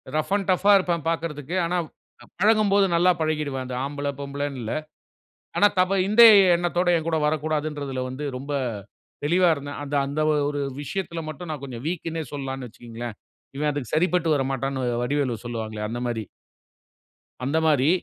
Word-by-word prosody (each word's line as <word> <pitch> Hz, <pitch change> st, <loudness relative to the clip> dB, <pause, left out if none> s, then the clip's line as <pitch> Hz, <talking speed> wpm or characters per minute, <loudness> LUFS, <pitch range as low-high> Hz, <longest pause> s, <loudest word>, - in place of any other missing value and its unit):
Rough 155 Hz, +4 st, -1 dB
and 200 Hz, -2 st, -1 dB
tough 185 Hz, +2 st, 0 dB
ஆ -, -, +8 dB
இருப்பேன் 175 Hz, -4 st, -1 dB
பார்க்கறதுக்கு, 160 Hz, -1 st, -3 dB
ஆனா 180 Hz, +2 st, 0 dB, 0.6 s
பழகும்போது 205 Hz, -1 st, +4 dB
நல்லா 175 Hz, +2 st, +5 dB
பழகிடுவேன் 150 Hz, -4 st, -1 dB
அந்த 125 Hz, 0 st, -5 dB
ஆம்பள 145 Hz, 0 st, -4 dB
பொம்பளன்னு 140 Hz, -1 st, -4 dB
இல்ல. 110 Hz, 0 st, -3 dB, 0.8 s
ஆனா 205 Hz, -, +6 dB
தவ 190 Hz, +2 st, +2 dB
இந்த 215 Hz, +3 st, +6 dB, 0.3 s
எண்ணத்தோட 175 Hz, +1 st, 0 dB
என்கூட 160 Hz, 0 st, -1 dB
வரக்கூடாதுன்றதுல 150 Hz, -3 st, -2 dB
வந்து 130 Hz, +4 st, -5 dB
ரொம்ப 140 Hz, +3 st, -6 dB, 0.7 s
தெளிவா 175 Hz, +3 st, +4 dB
இருந்தேன். 145 Hz, 0 st, -7 dB
அந்த 145 Hz, +1 st, -5 dB
அந்த 140 Hz, +2 st, -3 dB, 0.3 s
ஒரு 145 Hz, 0 st, -2 dB, 0.2 s
விஷயத்துல 170 Hz, +2 st, -4 dB
மட்டும் 165 Hz, +2 st, -7 dB
நான் 145 Hz, -2 st, -6 dB
கொஞ்சம் 125 Hz, -2 st, -7 dB
வீக்குன்னே 165 Hz, -2 st, -3 dB
சொல்லலாம்ன்னு 135 Hz, -3 st, -5 dB
வச்சுக்கங்களேன். 120 Hz, -1 st, -8 dB, 0.4 s
"இவன் 150 Hz, +1 st, +1 dB
அதுக்கு 140 Hz, -6 st, -5 dB
சரிப்பட்டு 170 Hz, -1 st, +2 dB
வரமாட்டான்ன்னு" 135 Hz, 0 st, -2 dB, 0.2 s
வடிவேலு 130 Hz, -4 st, -1 dB
சொல்லுவாங்களே 110 Hz, -2 st, -4 dB
அந்த 120 Hz, +2 st, -4 dB
மாரி. 115 Hz, -3 st, -3 dB, 1.2 s
அந்த 140 Hz, +5 st, 0 dB
மாரி 145 Hz, -2 st, +4 dB
145 Hz, 145 wpm, -24 LUFS, 135-170 Hz, 1.2 s, ஆ